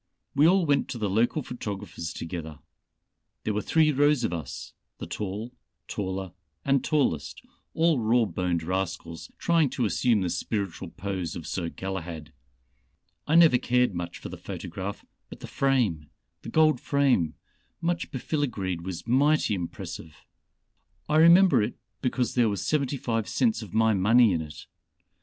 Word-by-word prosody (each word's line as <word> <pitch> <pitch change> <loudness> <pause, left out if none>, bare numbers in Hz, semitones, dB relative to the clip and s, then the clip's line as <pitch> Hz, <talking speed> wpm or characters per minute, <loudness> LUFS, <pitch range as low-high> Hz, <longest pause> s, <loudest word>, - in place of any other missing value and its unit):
We 145 +3 +5
all 185 0 +4
went 145 -2 +2
to - - -4
the 105 -4 -1
local 120 +8 +1
photographers 100 -9 -6
together. 80 -2 -6 0.9
There 110 - -1
were 105 - -1
three 155 +4 +3
rows 145 -1 +3
of 90 - 0
us 80 -6 -6 0.2
the - - -6
tall, 105 +4 -5 0.4
taller 95 -2 -4 0.3
and 135 -2 +2
tallest 135 - 0 0.3
all 165 -4 +3
raw 115 +1 +3
boned 90 -5 -1
rascals 85 -2 -4
trying 165 -4 +2
to 125 - -1
assume 110 0 +2
the 90 -2 -1
spiritual 95 0 -3
pose 95 -3 -4
of 80 - -7
Sir 85 +1 -3
Galahad. 85 -5 -6 0.9
I 155 - +2
never 165 -7 +7
cared 125 -3 +2
much 85 -1 -5
for - - -8
the - - -8
photograph, 95 +4 -6 0.2
but - - -11
the - - -6
frame 115 - 0 0.3
the - - -8
gold 155 -4 +4
frame 135 - +2 0.4
much 170 0 -1
befiligreed 120 - -2
was 90 -1 -6
mighty 140 +1 +3
impressive. 85 -3 -6 0.9
I 155 - +2
remember 170 - +7
it 105 - -2 0.3
because 125 -1 0
there 120 -3 +3
was 100 - -3
seventy 140 -2 0
five 115 -4 -2
cents 225 - +1
of 110 - -9
my 110 0 +3
money 110 +3 +5
in 80 - 0
it. 75 -2 -9
110 Hz, 150 wpm, -27 LUFS, 90-140 Hz, 0.9 s, never